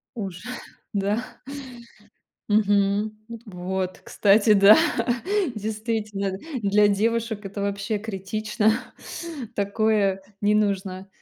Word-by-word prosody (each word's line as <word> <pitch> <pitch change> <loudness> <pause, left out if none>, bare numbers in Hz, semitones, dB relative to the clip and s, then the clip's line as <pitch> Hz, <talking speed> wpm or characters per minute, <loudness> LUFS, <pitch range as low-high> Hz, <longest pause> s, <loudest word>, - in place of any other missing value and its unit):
Уже, 190 -5 -5 0.5
да. 205 +3 0 1.3
Мгм. 205 0 +2
Вот. 230 -1 -9 0.3
Вот, 185 -1 -2
кстати, 210 +1 +4
да, 200 +1 +8 0.8
действительно, 215 -2 -2 0.2
для 205 0 +4
девушек 220 +1 0
это 200 +1 -5
вообще 200 +2 -1
критично, 215 +1 -1 0.8
такое 200 -1 +1 0.2
не 205 +1 +3
нужно. 195 -2 0
205 Hz, 85 wpm, -24 LUFS, 195-215 Hz, 1.3 s, да